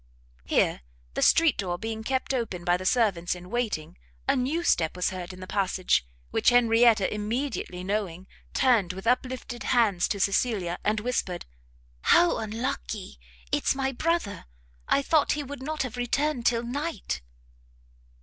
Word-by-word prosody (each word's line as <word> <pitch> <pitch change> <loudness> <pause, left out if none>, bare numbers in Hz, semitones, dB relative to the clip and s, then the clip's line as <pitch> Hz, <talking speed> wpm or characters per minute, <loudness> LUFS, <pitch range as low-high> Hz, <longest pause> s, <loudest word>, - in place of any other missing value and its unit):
Here, - - +2 0.3
the - - -2
street 325 -4 +5
door 180 -3 -1
being 220 +2 -4
kept 260 +2 -1
open 225 -9 -2
by 175 0 +3
the 185 +1 -3
servants 190 -8 +2
in 180 +2 -11
waiting, 220 - -2 0.3
a - - +4
new 285 +7 0
step 160 - +2
was 180 0 0
heard 185 -1 -6
in 185 0 -11
the - - -6
passage, 185 - +1 0.2
which - - +4
Henrietta 230 -4 +4
immediately 210 -4 -3
knowing, 190 -3 -2 0.3
turned, 220 -9 +3
with 190 +3 -8
uplifted 250 0 -1
hands 215 -8 +2
to 200 - -2
Cecilia, 195 -3 +1
and 215 +1 +1
whispered, 210 -6 -2 0.7
"How 345 0 +4
unlucky! 220 - -4 0.3
it's - - +2
my 270 0 0
brother! 290 - -1 0.4
I 280 - +3
thought 310 +1 +3
he 295 - -3
would 280 -1 -8
not 305 +1 -2
have 250 -2 -6
returned 245 +1 0
till 235 -1 +2
night!" 250 - -3
225 Hz, 150 wpm, -27 LUFS, 185-255 Hz, 0.7 s, street